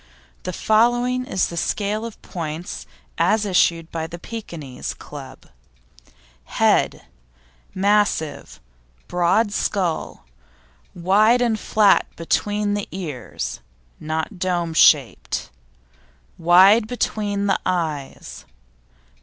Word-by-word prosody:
The 185 - -4
following 240 +5 +2
is 190 - +1
the 170 - -7
scale 210 +5 -1
of 230 - -12
points 160 - -6 0.3
as 215 -1 +2
issued 170 -4 +2
by 160 -1 -3
the 170 - -8
Pekinese 170 - -7
Club: 135 -3 -11 1.1
HEAD - - +2 0.7
Massive, 200 -5 0 0.5
broad 180 +5 +2
skull, 180 - -2 0.7
wide 215 +7 +4
and 225 -3 0
flat 210 -1 +3
between 205 +5 0
the 205 -1 -3
ears 150 - -5 0.4
(not 160 +3 -4
dome 175 -2 -1
shaped); 140 - +3 0.9
wide 190 +6 +6
between 205 -4 -2
the 195 - +1
eyes. 160 -6 -3
185 Hz, 95 wpm, -22 LUFS, 165-210 Hz, 1.1 s, wide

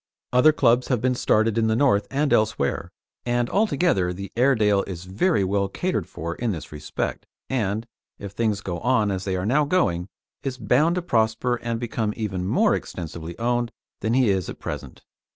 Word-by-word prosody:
Other 125 +5 +6
clubs 125 -4 +3
have 125 -4 +1
been 130 +3 +1
started 115 -2 +2
in 110 - +2
the 110 - +2
north 110 -6 +3
and 140 +1 +1
elsewhere, 110 -10 +1 0.3
and 120 0 0
altogether 175 - +2
the 100 +2 -7
Airedale 110 -5 +3
is 90 -3 -6
very 100 - +1
well 100 +1 +1
catered 145 - -2
for 85 +1 -5
in 120 +5 -2
this 80 - -8
respect, 75 0 -4 0.2
and, 110 -3 -1 0.3
if 100 -1 -7
things 105 -1 0
go 90 -3 -4
on 110 -4 +2
as 95 -1 -3
they 95 -2 -1
are 90 0 -2
now 140 +8 +3
going, 100 - +1 0.3
is 130 -2 -4
bound 135 +9 +2
to 180 - -2
prosper 115 -3 +1
and 115 -1 -3
become 115 -3 -2
even 95 -5 -2
more - - +3
extensively 85 -1 -5
owned 120 0 0 0.3
than 110 +2 0
he 125 -5 +4
is 95 -3 -1
at - - -7
present. - - -7
110 Hz, 185 wpm, -24 LUFS, 95-125 Hz, 0.3 s, Other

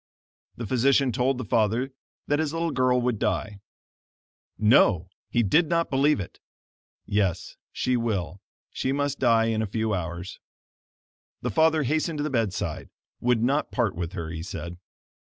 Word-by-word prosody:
The 115 - -4
physician 130 +3 +3
told 125 +3 +1
the 130 - -4
father 115 +6 +1 0.3
that 145 +1 +1
his 155 -1 -1
little 165 0 -1
girl 130 -2 +2
would 120 -3 0
die. 100 0 -1 1.0
No! 100 -5 +4 0.2
he 120 - +2
did 155 - +3
not 170 -1 +1
believe 140 +2 +3
it. 95 - -7 0.7
Yes, 95 -4 -1 0.2
she 125 - 0
will 100 - -2 0.3
she 130 - -2
must 145 0 -1
die 115 -3 +4
in 110 -1 0
a 110 - -1
few 110 +1 -1
hours. 90 0 -5 1.0
The - - -1
father 160 -1 +3
hastened 155 +4 0
to 145 - -1
the 150 - -2
bedside; 115 -6 -2 0.3
would 120 -2 +2
not 140 +5 +1
part 120 -6 0
with 85 +1 -5
her, 85 -4 -5
he 80 -1 -5
said. 85 0 -7
115 Hz, 155 wpm, -26 LUFS, 100-140 Hz, 1.0 s, No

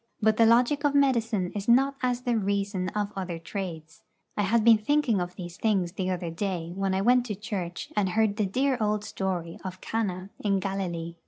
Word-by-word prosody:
But 220 0 +3
the 230 - +6
logic 245 +5 +4
of 285 -1 +2
medicine 230 -9 +2
is 205 -1 -4
not 270 +4 +4
as 250 -1 0
the 245 -2 0
reason 200 -2 -1
of 205 -1 -1
other 185 -3 -4
trades. 165 -2 -6 0.3
I - - 0
had 215 +3 +2
been 225 -1 +7
thinking 235 -4 +2
of 175 0 -5
these 175 -1 -8
things 195 -6 +1
the 185 0 -3
other 175 -2 -2
day 170 -1 -3
when 195 -1 0
I 190 - +1
went 245 +4 +4
to 210 - -3
church 185 -4 -5
and 205 -3 +2
heard 215 +1 +1
the 210 -3 +1
dear 260 +6 +1
old 210 0 +1
story 180 -5 -3
of 185 -1 -6
Cana 195 -4 -3
in 200 -2 +1
Galilee. 175 -4 -3
200 Hz, 200 wpm, -27 LUFS, 185-225 Hz, 0.3 s, been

